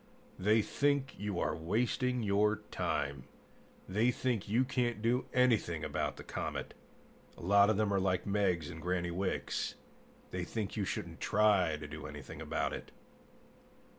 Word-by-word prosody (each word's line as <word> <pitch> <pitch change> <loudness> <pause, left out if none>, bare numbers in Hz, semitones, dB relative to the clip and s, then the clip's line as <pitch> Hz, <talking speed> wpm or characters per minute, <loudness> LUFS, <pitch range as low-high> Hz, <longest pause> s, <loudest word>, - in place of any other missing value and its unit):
They 105 +3 +4
think 140 +1 +1
you 105 -3 -2
are - - 0
wasting 120 +8 0
your 105 +1 +2
time; 70 -3 -1 0.6
they 105 +6 +2
think 120 -5 -1
you 120 +5 +4
can't 125 -4 0
do 120 +3 +1
anything 115 -10 +2
about - - -2
the - - -8
comet. - - -4 0.6
A - - -11
lot 100 +3 +6
of 110 - +2
them 105 -2 +2
are 100 - +3
like 95 -2 +1
Meggs 95 -6 +1
and 80 -1 -8
Granny 85 0 -1
Wicks: 95 +2 -2 0.6
they 90 -1 -2
think 105 +3 -3
you 105 -3 0
shouldn't 85 -3 -4
try 100 -7 +3
to 75 -1 -7
do 75 +1 -7
anything 75 -3 -8
about - - -1
it." - - -6
100 Hz, 155 wpm, -33 LUFS, 85-115 Hz, 0.6 s, lot